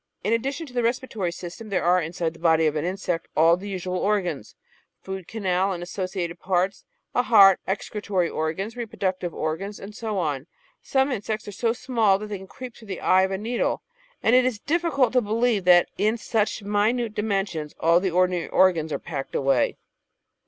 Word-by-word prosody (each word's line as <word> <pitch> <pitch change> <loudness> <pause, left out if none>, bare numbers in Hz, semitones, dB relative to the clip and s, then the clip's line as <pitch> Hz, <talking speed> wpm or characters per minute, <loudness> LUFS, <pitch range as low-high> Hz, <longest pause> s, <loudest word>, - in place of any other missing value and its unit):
In 210 +4 +1
addition 275 +8 -1
to 260 - -14
the 245 - +1
respiratory 230 -6 -1
system 180 +6 -8
there 195 - 0
are 180 +1 +4
inside 165 0 -3
the 165 - -16
body 160 -1 +3
of 155 - +2
the 150 -1 -2
insect 180 -2 -2
all 165 +2 +6
the 195 +3 -8
usual 185 -1 -3
organs 180 - -1 0.2
— - - -44
food 190 -2 -6
canal 190 -3 0
and 175 -1 -5
associated 180 -1 -4
parts, 185 +1 0 0.3
a - - +3
heart, 200 -6 +7
excretory 195 -2 -1
organs, 165 +9 -3
reproductive 190 -6 -3
organs, 190 +7 -4
and 200 +2 -9
so 215 -1 -4
on. 150 -5 -2 0.3
Some 265 +1 +1
insects 215 -2 -3
are - - -5
so 225 +3 0
small 230 -5 +2
that 210 +1 -7
they 205 -2 -4
can 190 - -11
creep 250 +3 -9
through 220 - -14
the 190 -2 -5
eye 185 - +4
of 190 - +2
a 190 - -2
needle, 230 +4 -1 0.4
and 230 - +4
it 255 - +6
is 250 -3 0
difficult 290 -3 +1
to 250 - +4
believe 220 -2 +1
that 175 -1 +6
in 215 +3 +2
such 220 -2 -1
minute 210 +3 +1
dimensions 195 -8 -2
all 165 +1 +4
the 190 +1 0
ordinary 180 0 +1
organs 170 -4 +3
are - - 0
packed 140 -5 -6
away. 135 -3 +2
195 Hz, 195 wpm, -24 LUFS, 175-220 Hz, 0.4 s, heart